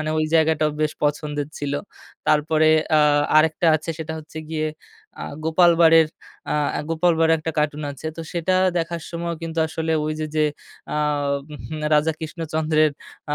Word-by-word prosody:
মানে 155 0 -2
ওই 155 - +2
জায়গাটাও 160 -1 +3
বেশ 155 -1 +1
পছন্দের 145 0 -1
ছিল। 145 -1 -3 0.5
তারপরে 155 +1 +3 0.3
আ - - +5 0.4
আরেকটা 160 +2 +3
আছে 155 +2 -6
সেটা 160 0 -5
হচ্ছে 160 +1 -10
গিয়ে 155 -1 -1 0.5
আ - - -5 0.2
'গোপাল 170 +2 +5
ভাড়ের' 165 -1 +6 0.4
আ - - +1 0.3
'গোপালভাড়' 165 0 +2
একটা 160 +1 -3
কার্টুন 150 0 0
আছে। 140 +3 -9
তো 165 - -5
সেটা 175 +2 0 0.2
দেখার 170 0 -2
সময়ও 170 0 -4
কিন্তু 165 0 -5
আসলে 160 0 -2
ওই 155 - -1
যে, 155 - -1
যে, 155 - +3 0.5
আ - - -1 0.6
উহু 155 +1 -7 0.2
'রাজা 150 +2 +3
কৃষ্ণচন্দ্রের' 155 -1 0 0.4
আ - - +2
160 Hz, 155 wpm, -22 LUFS, 155-165 Hz, 0.6 s, ভাড়ের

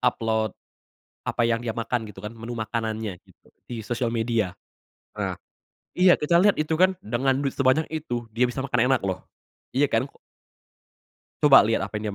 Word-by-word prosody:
Upload 110 -3 0 0.7
apa - - 0
yang 115 0 +2
dia 115 -2 -3
makan 115 0 -2
gitu 95 -1 -12
kan, 105 +2 -6
menu 115 +2 -7
makanannya 110 -3 -3
gitu - - -25 0.2
di 115 -2 -6
sosial 120 +1 -2
media. 110 -5 0 0.6
Nah, - - -2 0.6
iya 180 0 +5
kita 170 +3 +3
liat 205 +1 +4
itu 155 +1 0
kan 185 +1 +4
dengan 130 +4 0
duit 140 -2 -1
sebanyak 135 +4 +2
itu 120 -7 -3
dia 120 +3 +3
bisa 125 - -4
makan 125 -2 +1
enak 130 - +3
loh. 95 -2 -2 0.5
Iya 135 +3 +4
kan? 120 +5 0 1.3
Coba 145 -2 +9
liat 115 -2 +1
apa 105 +2 -3
yang 105 -1 -4
120 Hz, 170 wpm, -25 LUFS, 110-135 Hz, 1.3 s, Coba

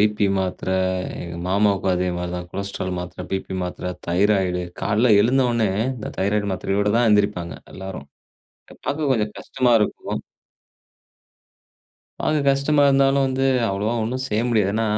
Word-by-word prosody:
P 105 -1 +2
மாத்திரை 95 -1 -2 0.5
எங்க 85 -1 -7
மாமாவுக்கும் 100 -1 +2
அதேமாரி 90 -1 -2
தான். 90 0 -7
கொலஸ்ட்ரால் 100 -1 -4
மாத்திரை, 90 0 -7
P - - +2 0.3
Pமாத்திரை 90 0 -4 0.2
தைராய்டு 95 0 +2 0.2
கால்ல 110 +3 +3
எழுந்த 130 +5 +3
உடனே 115 -3 +1 0.3
இந்த 110 - -6
தைராய்டு 100 +1 0
மாத்திரையோட 100 +2 0
தான் 120 0 +4
எழுந்திரிப்பாங்க, 100 -5 +1 0.2
எல்லாரும். 95 0 -7 0.8
பார்க்க 145 -1 0
கொஞ்சம் 105 -3 0
கஷ்டமா 130 -2 0
இருக்கும். 105 - -2 2.0
அது 155 - +2
கஷ்டமா 140 +2 +2
இருந்தாலும் 135 0 +4
வந்து, 135 0 0 0.2
அவ்ளோவா 105 +4 -1
ஒண்ணும் 125 +4 -2
செய்ய 110 -2 0
முடியாது. 105 -4 +2
ஏனா, 115 - +1
105 Hz, 130 wpm, -22 LUFS, 95-120 Hz, 2.0 s, தான்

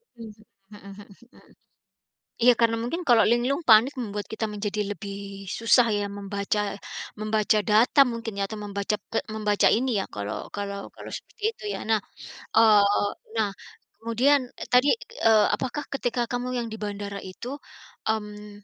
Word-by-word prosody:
Mmm, 230 -2 -9 0.4
mhm 200 0 -12 0.2
mhm, - - -21 0.9
iya 245 +1 +8
karena 230 -1 +3
mungkin 335 +9 -3
kalau 235 -2 +6
linglung 250 +6 +1
panik 225 +5 +7
membuat 205 -4 -4
kita 220 - -2
menjadi 210 0 -3
lebih 200 -1 -7 0.4
susah 230 +1 +5
ya 205 - -1
membaca 200 +1 -2 0.6
membaca 215 0 +2
data 230 +6 +5
mungkin 230 -3 -5
ya 200 - +1
atau 215 0 -6
membaca 200 +1 -2
pe 225 - 0 0.2
membaca 210 -1 +2
ini 255 +4 +1
ya - - -2
kalau 100 0 -4 0.2
kalau 200 -1 -4 0.2
kalau - - -10
seperti - - -15
itu 485 - -13
ya - - -4
nah, 225 - +4 0.6
eee, 215 -2 +7 0.5
nah 215 -2 +2 0.5
kemudian 245 +6 +3 0.3
tadi, 250 +3 +6 0.4
eee, 220 -2 +6
apakah 260 +4 -4
ketika 245 -3 -1
kamu 245 0 -2
yang 235 -1 -2
di 220 - -6
bandara 200 -1 -5
itu, 190 +6 -9 0.6
mmm, 210 -1 -4
220 Hz, 150 wpm, -26 LUFS, 205-240 Hz, 0.9 s, iya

